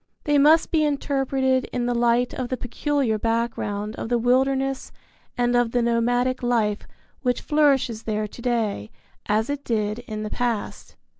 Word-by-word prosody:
They 295 Hz, -1 st, +3 dB
must 310 Hz, +3 st, +5 dB
be 315 Hz, -2 st, +3 dB
interpreted 270 Hz, -3 st, 0 dB
in 245 Hz, -1 st, -1 dB
the 245 Hz, -, 0 dB
light 240 Hz, +1 st, +2 dB
of 255 Hz, -2 st, -4 dB
the 255 Hz, -, -2 dB
peculiar 245 Hz, -2 st, -1 dB
background 225 Hz, -2 st, -2 dB
of -, -, -5 dB
the 240 Hz, -, +2 dB
wilderness 265 Hz, +2 st, +1 dB, 0.5 s
and 245 Hz, 0 st, +1 dB
of 245 Hz, -1 st, +2 dB
the 245 Hz, -1 st, +2 dB
nomadic 245 Hz, +2 st, +1 dB
life 225 Hz, -4 st, 0 dB, 0.3 s
which 250 Hz, -2 st, 0 dB
flourishes 275 Hz, -7 st, +2 dB
there 215 Hz, -1 st, -2 dB
to 235 Hz, -, -12 dB
day 225 Hz, -, -1 dB, 0.4 s
as 215 Hz, +2 st, +1 dB
it 285 Hz, 0 st, -4 dB
did 215 Hz, -1 st, -1 dB
in 215 Hz, -3 st, -6 dB
the 215 Hz, -, -5 dB
past. 240 Hz, -4 st, -3 dB
245 Hz, 160 wpm, -23 LUFS, 225-265 Hz, 0.5 s, must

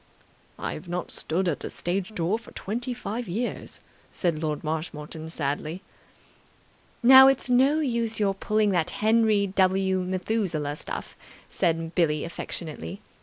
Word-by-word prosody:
"I -, -, -3 dB
have 170 Hz, -, -9 dB
not 175 Hz, +1 st, -3 dB
stood 180 Hz, +4 st, -1 dB
at 165 Hz, -, 0 dB
the -, -, -5 dB
stage 190 Hz, +4 st, -2 dB
door 180 Hz, +6 st, 0 dB
for 235 Hz, -, -14 dB
twenty 240 Hz, +5 st, -4 dB
five 240 Hz, -1 st, -4 dB
years," 220 Hz, +8 st, -4 dB, 0.3 s
said 170 Hz, -4 st, -1 dB
Lord 150 Hz, -2 st, -2 dB
Marshmoreton 155 Hz, 0 st, -4 dB
sadly. 155 Hz, +3 st, -3 dB, 1.2 s
"Now, 265 Hz, +2 st, +10 dB
it's 270 Hz, -2 st, +2 dB
no 275 Hz, +5 st, +4 dB
use 235 Hz, -5 st, -1 dB
your 200 Hz, -2 st, +2 dB
pulling 210 Hz, +2 st, +1 dB
that 175 Hz, -4 st, +1 dB
Henry 220 Hz, -1 st, +3 dB
W. 190 Hz, 0 st, +2 dB
Methuselah 180 Hz, -5 st, -1 dB
stuff," -, -, -6 dB, 0.3 s
said 165 Hz, 0 st, 0 dB
Billie 155 Hz, -4 st, +2 dB
affectionately. 155 Hz, -, -6 dB
185 Hz, 135 wpm, -26 LUFS, 160-220 Hz, 1.2 s, Now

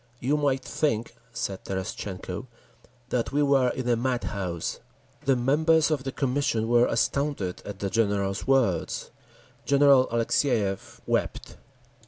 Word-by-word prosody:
"You 135 Hz, +4 st, +1 dB
might 140 Hz, -3 st, 0 dB
think," 115 Hz, -7 st, -1 dB, 0.2 s
said 100 Hz, -5 st, -4 dB
Terestchenko, 95 Hz, +2 st, -5 dB, 0.6 s
"that 120 Hz, -2 st, -1 dB
we 145 Hz, +1 st, +2 dB
were 135 Hz, -3 st, +4 dB
in 125 Hz, 0 st, -4 dB
a 120 Hz, -, +3 dB
madhouse!" 105 Hz, -8 st, -2 dB, 0.5 s
The 135 Hz, -1 st, +4 dB
members 155 Hz, +5 st, +3 dB
of 140 Hz, -3 st, -1 dB
the 135 Hz, -, -2 dB
Commission 130 Hz, -5 st, 0 dB
were 120 Hz, +1 st, +4 dB
astounded 120 Hz, -5 st, -1 dB
at 100 Hz, -1 st, -6 dB
the 100 Hz, 0 st, -2 dB
General's 100 Hz, -3 st, 0 dB
words. 130 Hz, -9 st, +1 dB, 0.5 s
General 140 Hz, -2 st, +5 dB
Alexeyev 115 Hz, -3 st, 0 dB
wept. -, -, -2 dB
125 Hz, 125 wpm, -26 LUFS, 100-140 Hz, 0.6 s, General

